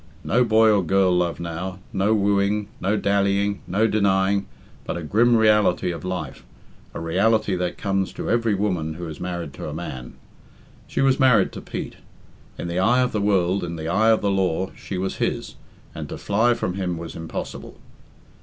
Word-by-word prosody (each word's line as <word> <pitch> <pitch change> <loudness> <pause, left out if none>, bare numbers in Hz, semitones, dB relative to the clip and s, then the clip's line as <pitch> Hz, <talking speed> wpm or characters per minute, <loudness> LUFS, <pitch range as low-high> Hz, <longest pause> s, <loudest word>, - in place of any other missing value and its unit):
No 125 +2 +3
boy 110 -1 +5
or 105 -2 +3
girl 95 +2 +3
love 90 -1 0
now, 85 +2 -5 0.2
no 95 +3 +1
wooing, 100 0 +1
no 100 +3 0
dallying, 100 0 +1
no 100 +5 +2
denying, 100 -2 +2 0.4
but - - -4
a 85 - -5
grim 115 +9 +3
reality 105 -5 +3
of 85 - -7
life 90 -6 -5 0.5
a - - -4
reality 100 +5 +1
that 90 -1 -2
comes 95 -2 -1
to - - -5
every 115 -2 +2
woman 90 -6 -1
who 85 0 -6
is 80 - -8
married 85 -5 -4
to - - -6
a 75 - -6
man. 65 -7 -7 0.7
She - - -2
was 135 0 +3
married 130 -3 +4
to - - -8
Pete. - - -6 0.6
In - - -5
the 85 +1 -2
eye 120 +7 +4
of 125 - +1
the 105 - -1
world, 95 -2 +1
in 85 -1 -4
the 80 0 -4
eye 110 +6 +3
of 110 - +4
the 100 - +1
law, 95 -1 0
she 95 - -6
was 95 +1 -3
his, - - -2 0.4
and - - -7
to - - -6
fly 115 +4 +2
from 90 - -2
him 90 -2 -2
was 85 0 -7
impossible. 80 -1 -6
95 Hz, 190 wpm, -23 LUFS, 90-105 Hz, 0.7 s, boy